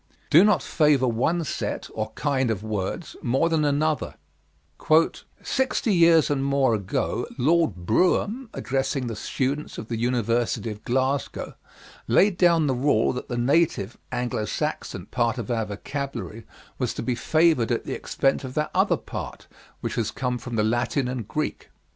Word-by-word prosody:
Do 165 +5 +8
not 205 -8 +3
Favor 150 -5 +3
one 130 +9 +1
Set 150 - -3
or 110 0 -3
Kind 135 -2 0
of 105 -2 -2
Words 110 - -4
more 135 +7 +1
than 160 -2 +1
Another 150 0 0 1.3
"Sixty 260 -4 0
years 165 -4 +5
and 135 -2 0
more 140 -3 +2
ago, 100 -4 -1
Lord 160 - +2
Brougham, 200 - +1
addressing 135 0 -2
the 115 -2 -4
students 140 +7 -3
of 110 - -7
the 115 -2 -2
University 120 -1 0
of 105 0 -10
Glasgow, 130 +3 -1 0.5
laid 180 - +4
down 170 -3 +4
the 135 - +1
rule 125 -3 +2
that 125 - -6
the 120 - -2
native 120 - +1 0.2
(Anglo 120 -3 -2
Saxon) - - -3
part 120 0 0
of 120 -1 -4
our 115 -2 0
vocabulary 115 +1 -5 0.3
was - - -1
to - - -4
be 125 - 0
favored 155 -2 +2
at - - 0
the - - -3
expense 135 0 0
of 130 -1 -7
that 150 0 -1
other - - +3
part - - -7 0.4
which - - -3
has 115 -2 -1
come 125 -1 -2
from 120 0 -6
the 105 - +2
Latin 120 +4 0
and 125 -4 -4
Greek. 155 +5 -3
130 Hz, 160 wpm, -25 LUFS, 115-155 Hz, 1.3 s, Do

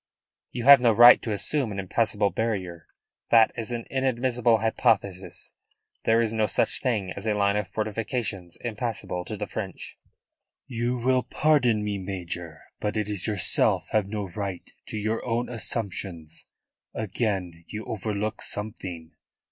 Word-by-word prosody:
"You 120 - -4
have 140 0 +9
no 120 -2 +4
right 120 +3 +9
to 115 - -3
assume 120 +4 0
an 100 - -5
impassable 100 +1 +1
barrier. 95 -7 -3 0.4
That 115 -2 +6
is 115 -2 -4
an 120 -1 -4
inadmissible 125 -3 +2
hypothesis. 100 -3 -1 0.5
There 115 +1 +4
is 115 -1 +1
no 110 -1 +1
such - - +1
thing 105 -8 -1
as 100 +4 -6
a 105 - +2
line 100 0 +2
of 105 -2 -1
fortifications 105 -3 -3
impassable 110 -6 -3
to 110 - -5
the 105 - -3
French." 100 -3 -7 0.7
"You 120 -1 -2
will 130 +1 +2
pardon 125 -8 +2
me, 105 -1 -2
Major, 90 -4 -6 0.2
but 105 +1 -2
it 105 -1 -1
is 100 -4 -2
yourself 100 -4 +1
have 105 -3 +2
no 105 -1 -4
right 95 0 -5 0.2
to - - -5
your 110 +2 -1
own 120 0 -1
assumptions. 95 -8 -4 0.5
Again 95 -5 -2
you 110 0 -6
overlook 105 0 -3
something. 90 -6 -5
110 Hz, 150 wpm, -26 LUFS, 95-115 Hz, 0.7 s, have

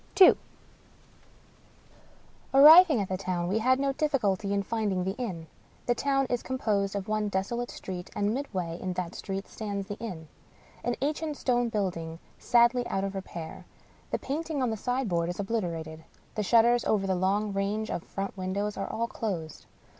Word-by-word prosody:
II 375 - +9 2.2
Arriving 310 0 +9
at 200 - -1
the 185 - -2
town, 180 -2 -2
we 200 +5 +1
had 255 +3 +3
no 275 0 +1
difficulty 240 - 0
in 200 0 +1
finding 205 -4 -1
the 190 +2 -2
inn. 185 -10 -4 0.4
The 245 - +3
town 275 +2 +1
is 245 -1 -1
composed 205 -6 -1
of 195 -1 -3
one 215 -1 0
desolate 235 +6 -2
street; 180 -1 -7
and 205 +1 +1
midway 185 -11 -3
in 185 -1 -3
that 180 -1 -4
street 195 0 -5
stands 200 -2 -4
the 205 +1 -6
inn 180 -9 -6 0.3
— - - -27
an 245 0 0
ancient 300 0 -2
stone 245 -2 +1
building 170 -6 -2 0.2
sadly 240 0 +3
out 195 - -1
of 195 0 -2
repair. 175 -4 -7 0.5
The - - 0
painting 300 -1 -3
on 245 - +1
the - - -1
sign 250 +3 -1
board 170 -2 0
is 175 - -5
obliterated. 170 -7 -3 0.3
The 215 - -2
shutters 235 +3 +4
over 200 -2 +1
the 190 - +1
long 200 +3 0
range 205 +2 -1
of - - -2
front 195 +3 -5
windows 200 +2 -2
are - - -3
all 230 - -1
closed. 180 -9 -5
205 Hz, 175 wpm, -28 LUFS, 185-245 Hz, 2.2 s, II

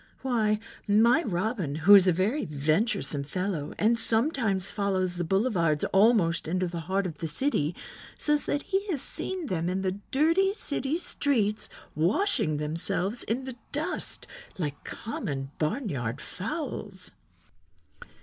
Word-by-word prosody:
Why, 220 -5 +1 0.3
my 230 +8 +5
Robin, 190 - -2
who 160 +6 +6
is 195 -2 +8
a - - +6
very 200 - 0
venturesome 150 - 0
fellow 175 0 -3
and 230 +2 +3
sometimes 225 - +1
follows 190 -3 0
the 175 - -1
boulevards 175 -5 +1
almost 195 -6 +4
into 185 +2 0
the 170 0 -5
heart 195 +1 +1
of 165 -4 -5
the 165 - -2
city, 160 - 0 0.4
says 295 -1 +3
that 285 - 0
he 390 +2 -1
has 320 -9 -1
seen 370 -3 -2
them 175 - -1
in 190 +1 -1
the 190 +1 -2
dirty 330 +8 +3
city 285 -5 -1
streets 235 - 0 0.2
washing 175 - +1
themselves 165 +8 0
in 245 +4 -1
the 260 -2 -7
dust 315 +5 -2 0.3
like 145 -5 -4
common 140 -11 -5
barnyard 150 - -2
fowls." 205 - -5
200 Hz, 135 wpm, -28 LUFS, 165-255 Hz, 0.4 s, is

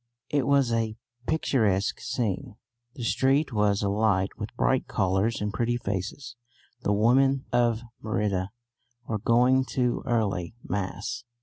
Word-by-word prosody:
It 145 -3 +1
was 140 -4 +3
a 115 -1 0 0.3
picturesque 110 -11 +1
scene. 120 -1 -3 0.4
The 125 - -6
street 135 +4 +2
was 105 -1 +2
alight 100 -1 +2
with - - -6
bright - - +1
colours 95 +4 +1
and 105 0 -2
pretty 120 +1 0
faces. 105 +5 -4 0.5
The 105 - 0
women 130 +6 +3
of 120 -2 +2 0.2
Merida 100 -4 -1 0.6
were 110 - -1
going 125 +4 +4
to 125 -2 +1
early 105 -6 0
mass. 100 +5 -3
115 Hz, 125 wpm, -27 LUFS, 100-125 Hz, 0.6 s, going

